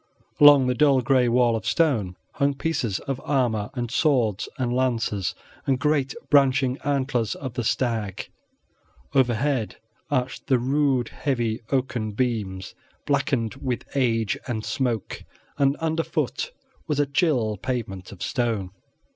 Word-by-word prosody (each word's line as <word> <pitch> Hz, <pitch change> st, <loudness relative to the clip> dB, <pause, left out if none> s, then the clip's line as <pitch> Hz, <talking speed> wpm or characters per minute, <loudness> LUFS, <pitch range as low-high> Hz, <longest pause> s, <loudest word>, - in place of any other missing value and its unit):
Along 145 Hz, -2 st, +8 dB
the 125 Hz, -, +2 dB
dull 140 Hz, -1 st, +4 dB
gray 125 Hz, 0 st, +3 dB
wall 120 Hz, -1 st, +3 dB
of 110 Hz, -, -3 dB
stone 115 Hz, -, +1 dB, 0.2 s
hung 140 Hz, 0 st, +1 dB
pieces 130 Hz, -10 st, -1 dB
of 135 Hz, -1 st, -4 dB
armor, 120 Hz, -7 st, 0 dB
and 120 Hz, -2 st, -3 dB
swords 120 Hz, -, +1 dB
and 125 Hz, -3 st, -1 dB
lances, 115 Hz, -7 st, 0 dB, 0.3 s
and 135 Hz, -2 st, +3 dB
great 145 Hz, -2 st, +1 dB, 0.2 s
branching 135 Hz, -2 st, +4 dB
antlers 130 Hz, -6 st, 0 dB
of 130 Hz, -4 st, -6 dB
the 120 Hz, -1 st, -2 dB
stag. 110 Hz, -4 st, -1 dB, 0.9 s
Overhead 130 Hz, -2 st, +1 dB, 0.3 s
arched 130 Hz, -3 st, -2 dB
the 130 Hz, -2 st, +4 dB
rude, 130 Hz, -1 st, +1 dB
heavy, 120 Hz, -6 st, -2 dB
oaken 125 Hz, -5 st, -1 dB
beams, 105 Hz, -6 st, -2 dB, 0.3 s
blackened 140 Hz, -5 st, 0 dB
with 125 Hz, -3 st, -2 dB
age 115 Hz, -6 st, +1 dB
and 110 Hz, -4 st, -3 dB
smoke, 120 Hz, -6 st, -2 dB, 0.4 s
and 140 Hz, 0 st, +3 dB
underfoot 165 Hz, -, -2 dB, 0.4 s
was 150 Hz, -2 st, 0 dB
a 145 Hz, -, +4 dB
chill 135 Hz, -, +1 dB
pavement 100 Hz, -6 st, -4 dB
of 100 Hz, -, -8 dB
stone. 115 Hz, -7 st, -1 dB
125 Hz, 130 wpm, -24 LUFS, 115-140 Hz, 0.9 s, Along